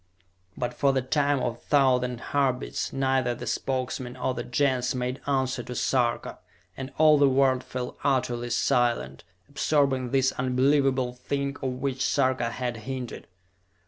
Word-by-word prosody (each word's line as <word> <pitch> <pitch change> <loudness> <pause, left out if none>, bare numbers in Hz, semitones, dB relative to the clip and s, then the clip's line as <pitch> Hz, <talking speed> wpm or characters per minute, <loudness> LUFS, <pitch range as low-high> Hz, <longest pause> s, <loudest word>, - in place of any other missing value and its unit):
But 120 - -2
for 140 -1 +2
the 130 -1 0
time 145 +1 +1
of 120 - 0
a 115 - -18
thousand 125 -4 +2
heartbeats 135 -3 0
neither 130 -2 +1
the - - -7
Spokesmen 130 -1 -3
or 130 +1 -1
the 120 - -4
Gens 125 0 0
made 125 +1 -3
answer 130 -2 0
to 125 +1 -7
Sarka, 120 -3 0 0.4
and 135 0 -6
all 155 -1 +6
the 140 -1 +5
world 130 -1 +3
fell 125 -1 -5
utterly 120 -3 0
silent, 120 - +1 0.2
absorbing 140 -3 +1
this 135 +1 +2
unbelievable 130 0 +1
thing 140 +2 -3
of 130 -2 -1
which 130 0 -2
Sarka 130 -4 +1
had 120 -1 -3
hinted. 125 +2 -6
130 Hz, 145 wpm, -26 LUFS, 125-135 Hz, 0.4 s, all